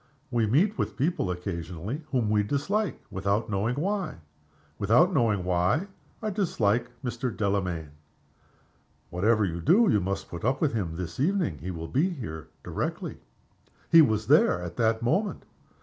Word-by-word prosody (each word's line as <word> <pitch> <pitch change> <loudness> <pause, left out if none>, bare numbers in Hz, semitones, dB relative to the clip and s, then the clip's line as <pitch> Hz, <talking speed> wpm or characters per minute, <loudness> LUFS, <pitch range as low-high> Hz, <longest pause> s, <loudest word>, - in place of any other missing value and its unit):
We 115 -3 +2
meet 180 - +2
with - - -2
people 140 - 0
occasionally 90 - -4
whom 120 -7 +1
we 105 -1 +4
dislike 155 - -1
without 100 +3 -1
knowing 105 +5 0
why. 195 +6 -1 0.6
Without 125 - +4
knowing 110 - +2
why, 90 - +1 0.3
I 215 - -1
dislike 120 - +1 0.2
Mr. 125 +1 -2
Delamayn." 95 -8 -2 1.2
"Whatever 105 +4 +2
you 85 -2 -3
do 205 - +5
you 105 - +4
must 95 +1 -3
put 85 - -7
up 130 +4 +1
with 155 -6 +1
him 90 -8 -2
this 85 +2 -6
evening. 150 - +1
He 85 +6 -6
will 80 -2 -5
be 155 - +1
here 105 - -6 0.2
directly." - - -4 0.7
He 165 - +9
was 110 -7 +2
there - - +4
at 85 -1 -6
that 115 0 +1
moment. 200 - 0
110 Hz, 150 wpm, -27 LUFS, 90-145 Hz, 1.2 s, He